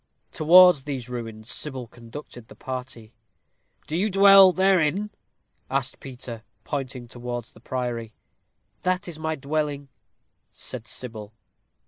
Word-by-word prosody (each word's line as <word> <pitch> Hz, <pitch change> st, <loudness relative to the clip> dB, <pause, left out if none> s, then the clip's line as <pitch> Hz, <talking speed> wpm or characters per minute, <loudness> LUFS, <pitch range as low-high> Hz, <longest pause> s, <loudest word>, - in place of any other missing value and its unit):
Towards 175 Hz, -2 st, +7 dB
these 130 Hz, -4 st, -5 dB
ruins 115 Hz, -2 st, -6 dB
Sybil 135 Hz, -4 st, -2 dB
conducted 120 Hz, 0 st, -11 dB
the -, -, -14 dB
party. 125 Hz, -3 st, -7 dB, 0.7 s
"Do 155 Hz, -, -4 dB
you 200 Hz, +5 st, +1 dB
dwell 195 Hz, -1 st, +8 dB
therein?" 190 Hz, +1 st, +2 dB, 0.6 s
asked 135 Hz, -1 st, -1 dB
Peter, 125 Hz, -3 st, -8 dB, 0.2 s
pointing 130 Hz, -4 st, -5 dB
towards 120 Hz, -1 st, -6 dB
the -, -, -17 dB
priory. 120 Hz, -2 st, -4 dB, 0.7 s
"That 185 Hz, 0 st, 0 dB
is 165 Hz, -3 st, -6 dB
my 160 Hz, 0 st, -2 dB
dwelling," 145 Hz, -1 st, -3 dB, 0.6 s
said 120 Hz, -3 st, -6 dB
Sybil. 110 Hz, -4 st, -6 dB
130 Hz, 115 wpm, -25 LUFS, 120-160 Hz, 0.7 s, dwell